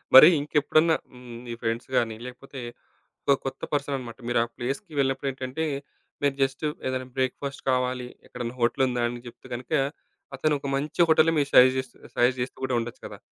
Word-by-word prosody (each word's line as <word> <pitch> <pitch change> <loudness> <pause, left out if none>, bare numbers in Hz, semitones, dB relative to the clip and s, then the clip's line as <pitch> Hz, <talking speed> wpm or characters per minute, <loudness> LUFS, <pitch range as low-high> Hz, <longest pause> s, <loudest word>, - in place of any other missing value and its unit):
మరి 130 - +13
ఇంకెప్పుడన్నా 155 +2 +3 0.5
మీ 120 - -5
ఫ్రెండ్స్ 115 +1 -2
గాని, 115 -2 +1
లేకపోతే 130 +2 -9 0.7
ఒక 140 - +6
కొత్త 135 - -4
పర్సనన్నమాట 135 -4 -2
మీరా 120 -1 +3
ప్లేస్‌కి 135 +8 -4
వెళ్ళినప్పుడేంటంటే, 135 +2 -1 0.6
మీరు 140 -1 +2
జస్టు 135 +3 +1 0.2
ఏదైనా 130 0 -2
బ్రేక్ఫాస్ట్ 135 +2 -2
కావాలి, 125 -1 0 0.2
ఎక్కడైనా 120 0 -5
హోటలుందా 125 0 +2
అని 120 0 -7
చెప్తే 125 +2 -13
గనుక, 125 +1 -6 0.6
అతనోక 150 -2 0
మంచి 150 +4 -1
హోటల్ 160 +1 +6 0.2
సజస్ 130 +1 +8
చేస్తూ 130 -2 -7 0.2
సజస్ట్ 125 +1 +3
చేస్తూ 125 - -8
కూడా 130 -1 0
ఉండొచ్చు 115 0 -6
కదా! - - -11
130 Hz, 145 wpm, -26 LUFS, 125-140 Hz, 0.7 s, మరి